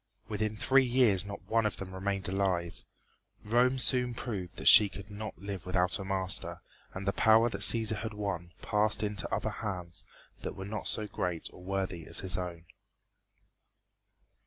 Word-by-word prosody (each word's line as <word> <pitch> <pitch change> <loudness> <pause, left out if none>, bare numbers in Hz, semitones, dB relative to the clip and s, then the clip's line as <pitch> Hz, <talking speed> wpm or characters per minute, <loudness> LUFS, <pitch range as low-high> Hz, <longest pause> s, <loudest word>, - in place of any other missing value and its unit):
Within 110 0 -3
three 135 +4 +4
years 120 -6 +3
not 100 - -8
one 115 0 +1
of 105 -3 -2
them 95 -1 -8
remained 100 +1 -3
alive. 95 -3 -2 0.6
Rome 125 +4 +2
soon 125 -1 +4
proved 95 -8 -5
that - - -3
she 105 -1 +9
could 100 +1 -11
not 105 +1 -7
live 100 -3 -7
without 90 +1 +1
a - - -5
master, 95 -1 -2 0.3
and 95 +1 -6
the 100 - +1
power 110 +1 +4
that - - -5
Cæsar 110 -2 +6
had 110 -2 -5
won 95 -4 -4
passed 105 +1 +1
into 105 -1 -3
other - - -1
hands 90 -6 -6 0.4
that - - -5
were 95 -1 -7
not 110 +2 -5
so 110 - +2
great 90 -5 -4
or - - -14
worthy 95 -3 -4
as - - 0
his 95 -1 -5
own. 90 -2 -5
100 Hz, 170 wpm, -30 LUFS, 95-110 Hz, 0.6 s, she